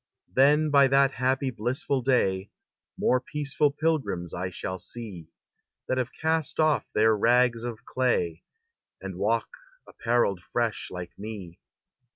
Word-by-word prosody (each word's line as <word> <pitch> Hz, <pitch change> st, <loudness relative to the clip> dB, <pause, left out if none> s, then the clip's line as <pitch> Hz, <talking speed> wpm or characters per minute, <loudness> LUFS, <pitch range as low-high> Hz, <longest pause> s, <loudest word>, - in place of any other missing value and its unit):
Then 150 Hz, +3 st, +4 dB
by 140 Hz, -1 st, +6 dB
that 135 Hz, 0 st, +4 dB
happy, 130 Hz, +1 st, 0 dB
blissful 125 Hz, +4 st, -1 dB
day, 100 Hz, -7 st, +1 dB, 0.5 s
More 125 Hz, -, +3 dB
peaceful 145 Hz, +1 st, 0 dB
pilgrims 140 Hz, -, -1 dB
I 90 Hz, +1 st, -3 dB
shall 95 Hz, +1 st, -5 dB
see, 95 Hz, -5 st, -7 dB, 0.6 s
That 130 Hz, -, 0 dB
have 125 Hz, -, -1 dB
cast 160 Hz, -1 st, -1 dB
off 155 Hz, -1 st, +2 dB
their 110 Hz, +1 st, +4 dB
rags 120 Hz, +2 st, +3 dB
of 120 Hz, -3 st, -6 dB
clay, 95 Hz, -10 st, 0 dB, 0.6 s
And -, -, -7 dB
walk -, -, +1 dB, 0.4 s
apparelled 115 Hz, -6 st, 0 dB
fresh 115 Hz, +3 st, -2 dB
like 90 Hz, -1 st, -7 dB
me. 100 Hz, -5 st, -8 dB
120 Hz, 130 wpm, -27 LUFS, 100-135 Hz, 0.6 s, by